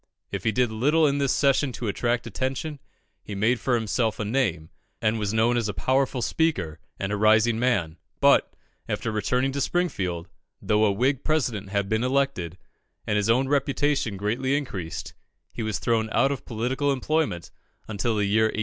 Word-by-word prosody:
If - - -4
he 110 - +3
did 125 -1 +1
little 150 +9 +3
in 145 -1 +2
this 140 -1 +2
session 140 -1 +2
to 120 - -4
attract 120 +3 0
attention, 135 +3 -3 0.4
he 105 - -7
made 115 +5 +2
for 125 +3 +1
himself 110 0 0
a 105 - -1
name, 105 -9 -1 0.3
and 110 0 +1
was 105 -1 -1
known 115 +2 +2
as 115 -3 0
a 100 - -4
powerful 130 +6 +1
speaker 150 - 0 0.2
and 95 0 -2
a - - +1
rising 110 +2 +4
man; 100 -10 0 0.2
but, - - +4 0.4
after 115 - -2
returning 125 +5 0
to 140 +1 -2
Springfield, 95 - -1 0.3
though 105 +1 +2
a 105 - +3
Whig 130 +6 0
President 120 -11 -1
had 100 0 -1
been 110 +3 0
elected, 130 -10 0 0.5
and 105 - 0
his 105 +1 +1
own 130 +4 +3
reputation 140 -5 0
greatly 125 +8 0
increased, 95 - -5 0.4
he - - -5
was 110 -3 -1
thrown 110 -1 0
out 135 +5 +3
of 140 - -5
political 125 +5 -1
employment 140 - -1 0.4
until 110 +2 -1
the 105 -1 +1
year 110 +2 +3
1854. 110 - -1
115 Hz, 180 wpm, -25 LUFS, 105-135 Hz, 0.5 s, rising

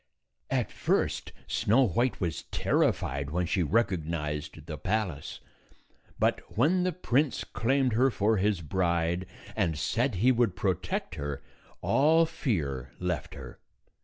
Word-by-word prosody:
At - - 0
243 - - -17
first - - +1
Snow 120 +5 +3
White 120 +8 0
was 85 -6 -2
terrified 70 +1 0
when 90 +4 0
she 90 +3 0
recog 95 -3 +1
nized 75 -1 -4
the 80 -2 -5
palace; 95 -8 -2 0.8
but - - +2 0.2
when 165 +10 +4
the 180 0 +1
prince 150 -5 0
claimed 130 +1 +1
her 130 +4 +4
for 110 -2 +1
his 100 -2 +1
bride, 85 +1 0 0.3
and 85 -8 0
said 120 - 0
he 120 +8 +4
would 120 -7 +2
protect 95 -4 -1
her, 70 -1 -4 0.4
all 160 +4 +4
fear 75 - -2
left 90 -3 -3
her. 65 -3 -10
95 Hz, 135 wpm, -29 LUFS, 80-120 Hz, 0.8 s, when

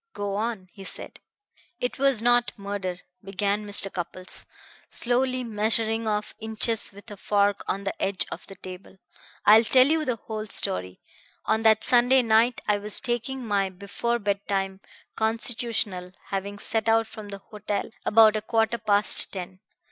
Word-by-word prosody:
"Go 200 -1 -3
on," 215 -3 -3
he 195 - -11
said. - - -6 0.6
"It 245 - -3
was 270 -5 +2
not 240 0 +2
murder," 200 -3 -5 0.2
began 200 +2 -2
Mr. 200 -1 +2
Cupples, 185 +1 -4 0.4
slowly 255 +1 -1
measuring 225 0 -1
off 210 0 -2
inches 220 0 +1
with 205 +2 -13
a 205 - -8
fork 200 0 +1
on 195 - -2
the 195 - -2
edge 195 -1 +1
of - - -8
the 195 - -10
table. 185 +1 -11 0.5
"I 210 +1 +9
will 225 - +4
tell 255 +3 +5
you 315 +2 +1
the 255 -5 -1
whole 215 0 -6
story. 90 - -1 0.4
On 220 - +1
that 220 -1 +4
Sunday 250 +1 +5
night 230 +1 +3
I 205 -1 +2
was 210 0 +3
taking 255 +1 -3
my 200 -3 0
before 200 +5 -3
bedtime 200 -2 -2 0.3
constitutional, 220 -5 -1 0.2
having 200 +1 -4
set 225 +2 -1
out 225 0 +3
from 215 -2 -10
the 200 - -6
hotel 210 +1 -5
about 220 0 +5
a 215 - -1
quarter 225 +1 0
past 210 -1 +4
ten. 185 -1 -7
210 Hz, 160 wpm, -25 LUFS, 200-230 Hz, 0.6 s, I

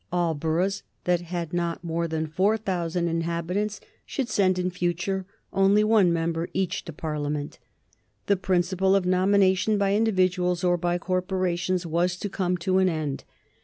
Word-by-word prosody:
All 175 -2 +1
boroughs 170 +6 -1 0.2
that 175 -1 +1
had 175 -1 -5
not 170 -1 -2
more 170 0 -1
than 160 -1 -2
4000 180 -1 0
inhabitants 170 +5 -2 0.2
should 270 -5 -3
send 185 -2 +2
in 180 0 -1
future 180 +2 -2 0.3
only 195 +2 +4
one 215 -5 +4
member 165 0 -1
each 190 -2 -1
to - - -6
Parliament. 150 -2 -4 0.7
The 200 - +3
principle 190 0 +1
of 195 -2 +2
nomination 190 +2 +3
by 200 -1 +2
individuals 185 -4 +1
or 175 -1 +3
by 175 0 0
corporations 185 0 -1
was 175 +2 0
to 205 - -4
come 180 -2 -1
to 185 +2 +1
an 190 -1 +4
end. 155 -4 -3
180 Hz, 150 wpm, -26 LUFS, 170-190 Hz, 0.7 s, only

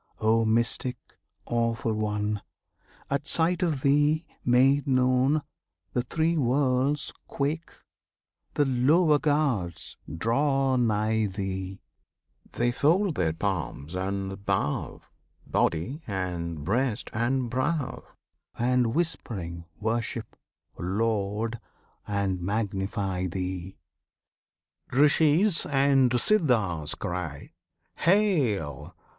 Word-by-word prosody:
O 110 +1 +3
Mystic, 115 +3 +1 0.5
Awful 115 -1 0
One! 105 -1 -1 0.7
At 140 +1 -1
sight 170 +1 +1
of 160 -7 0
Thee, 150 +3 +3 0.2
made 135 +4 +4
known, 130 +3 +3 0.5
The 125 - +1
Three 165 +5 0
Worlds 135 +1 +1
quake; 150 +4 -2 0.9
the 145 - +3
lower 145 +5 +4
gods 125 - 0
draw 135 - +1
nigh 110 -2 +1
Thee; 95 -1 -5 0.7
They 120 0 +1
fold 170 +9 +2
their 85 - +1
palms, 80 -4 -3
and 95 +1 -3
bow 95 -8 -1 0.4
Body, 90 - 0
and 85 -5 -3
breast, 115 - -1
and 120 +2 0
brow, 130 +3 -1 0.5
And, 125 -1 +2
whispering 95 - -2
worship, 115 +1 -2 0.4
laud 105 +3 -1 0.5
and 100 -3 -1
magnify 95 -1 -2
Thee! 90 0 -4 1.1
Rishis 155 +7 +4
and 135 -2 +3
Siddhas 115 - +1
cry 85 -5 -5 0.5
"Hail! 150 - +1
115 Hz, 90 wpm, -27 LUFS, 95-140 Hz, 1.1 s, made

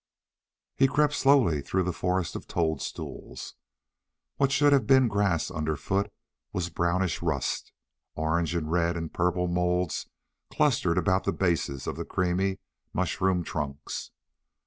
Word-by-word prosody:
He 135 - +5
crept 150 +2 +2
slowly 135 - +4
through 95 +6 0
the 90 0 -1
forest 90 0 -1
of - - -6
toadstools. 80 -5 -3 0.8
What 135 -1 +2
should 145 +1 +5
have 130 -6 +3
been 130 -2 +6
grass 100 -5 +1
underfoot 80 +5 -1 0.4
was 90 -1 -2
brownish 85 +2 0
rust. 80 -6 -1 0.4
Orange 80 +2 0
and 80 -2 -2
red 85 0 +1
and 80 -2 -5
purple 90 0 +1
moulds 90 -1 0 0.4
clustered 115 - +2
about 95 +1 +2
the - - +2
bases 80 -7 0
of - - -3
the - - -4
creamy 95 +2 0 0.4
mushroom 95 -2 +1
trunks. 75 -2 -4
90 Hz, 130 wpm, -28 LUFS, 80-95 Hz, 0.8 s, been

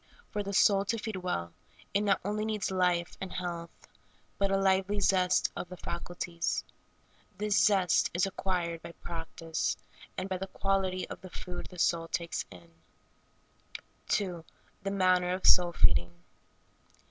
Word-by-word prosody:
For 210 - -1
the 200 0 -4
soul 195 0 +5
to 230 +3 0
feed 220 -2 -4
well, 85 - -3 0.4
it 200 - +3
not 200 -2 +3
only 210 +1 -1
needs 215 -3 -1
life 180 -2 +1
and 190 - -4
health, 170 -2 -4 0.7
but 195 0 +2
a 195 - +3
lively 195 +1 +2
zest 185 -2 +3
of 175 - -5
the 180 - -8
faculties. 170 0 -3 0.7
This 210 -1 +3
zest 190 -5 +4
is 175 +2 +2
acquired 175 -4 -2
by 170 - -9
practice, 165 -1 -3 0.4
and 185 - -2
by 185 -1 -2
the 195 - -4
quality 190 -1 0
of - - -7
food 180 0 -7
the 180 - -12
soul 165 -1 +2
takes 170 0 -2
in. 85 -2 -14 1.4
2. 180 -5 0 0.4
The 195 - -2
manner 185 -2 +3
of 185 - -3
soul 175 -1 +7
feeding. 90 - +3
185 Hz, 145 wpm, -31 LUFS, 170-195 Hz, 1.4 s, soul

